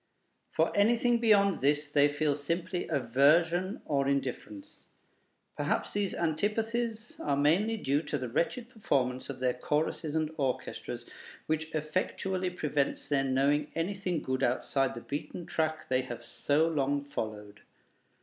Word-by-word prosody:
For - - +1
anything 235 +3 +3
beyond 200 -4 +4
this 145 +2 +2
they 145 -1 +5
feel 145 0 +1
simply 170 +5 -2
aversion 160 - +2
or 140 -2 +1
indifference. 130 -7 -4 0.7
Perhaps - - -1
these 200 -2 -1
antipathies 220 +7 -1
are 140 -1 0
mainly 185 +11 +3
due 145 -6 +1
to 150 - -3
the 130 -2 -4
wretched 170 - -1
performance 135 - -1
of - - -6
their 125 -1 +1
choruses 150 +3 -1
and 155 -1 0
orchestras, 135 -4 -3 0.4
which 160 0 -1
effectually 185 +4 -1
prevents 150 -5 -1
their 140 -2 +2
knowing 140 +3 +1
anything 180 0 -1
good 130 0 -1
outside 130 +1 +1
the 120 - -6
beaten 150 +6 -5
track 155 -1 -1
they 130 0 +2
have 125 -2 -7
so 150 +3 +1
long 140 -3 0
followed. 105 -6 -5
150 Hz, 135 wpm, -30 LUFS, 140-185 Hz, 0.7 s, they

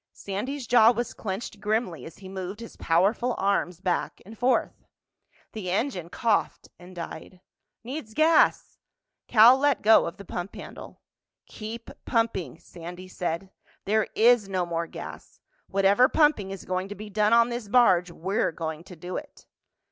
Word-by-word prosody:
Sandy's 245 +8 -5
jaw 230 -1 +6
was 240 0 -1
clenched 205 +1 -5
grimly 210 -4 -2
as 165 - -11
he 190 - -11
moved 190 +2 -6
his 230 - -10
powerful 205 +9 +1
arms 190 -3 0
back 180 -2 -2
and 220 +3 -11
forth. 250 +3 0 0.7
The 205 -5 -5
engine 190 - -2
coughed 220 +2 -1
and 180 +1 -13
died. 170 +1 -8 0.4
"Needs 245 -3 -7
gas!" 320 +1 +3 0.5
Cal 240 +4 +7
let 285 -2 +2
go 220 +1 +6
of 170 - -7
the 200 - -11
pump 175 +2 -6
handle. - - -10 0.4
"Keep 225 +2 -8
pumping," 225 - -1
Sandy 175 +2 -10
said. 180 +1 -4 0.3
"There 215 +1 +1
is 230 -3 +4
no 185 -2 0
more 170 -1 -3
gas. - - -10 0.3
Whatever 200 +6 +4
pumping 295 -11 +2
is 195 -1 -8
going 185 +1 -2
to 205 - -6
be 210 0 -9
done 210 +1 +2
on 235 +1 +5
this 240 -2 -5
barge—we're 185 -5 +2
going 160 0 -5
to 180 - -11
do 175 +2 -6
it." 295 -1 -10
200 Hz, 155 wpm, -26 LUFS, 180-235 Hz, 0.7 s, Cal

